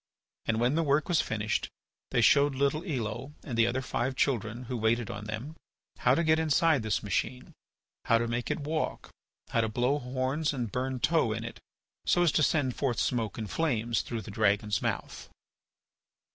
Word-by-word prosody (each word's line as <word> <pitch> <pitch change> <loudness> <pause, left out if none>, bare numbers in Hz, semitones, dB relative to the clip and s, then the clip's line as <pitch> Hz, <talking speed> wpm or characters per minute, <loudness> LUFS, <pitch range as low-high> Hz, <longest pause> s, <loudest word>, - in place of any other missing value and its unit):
And 115 -1 +1
when 120 +3 +2
the 165 - +2
work 150 -1 +2
was 175 -3 +3
finished 105 -1 -2 0.4
they - - +2
showed 140 +4 +5
little 140 +4 +1
Elo 130 - -4
and 130 - -5
the 115 0 +4
other 130 +2 -1
five 125 +2 -1
children 120 -3 0
who 125 +1 -4
waited 115 0 +1
on 100 +1 -7
them 110 +9 -5 0.4
how - - +4
to 170 - +1
get 155 0 +3
inside 160 -2 +3
this 110 -1 -1
machine, 125 +5 -2 0.5
how 115 - +4
to 115 +1 -1
make 120 +1 -2
it - - -1
walk, 155 +2 -3 0.4
how 115 - +2
to 110 - 0
blow 125 +6 +1
horns 130 +4 -1
and 120 -6 -3
burn 130 0 -2
tow 145 -5 +2
in 115 +1 -4
it 115 - -7 0.4
so 175 - +3
as 170 - +4
to 155 - +2
send 140 -4 +2
forth 130 -5 -1
smoke 115 -4 -1
and 110 -3 -5
flames 120 -8 0
through 115 -2 -4
the 110 - -8
dragon's 105 0 +1
mouth. - - -3
125 Hz, 185 wpm, -29 LUFS, 115-145 Hz, 0.5 s, showed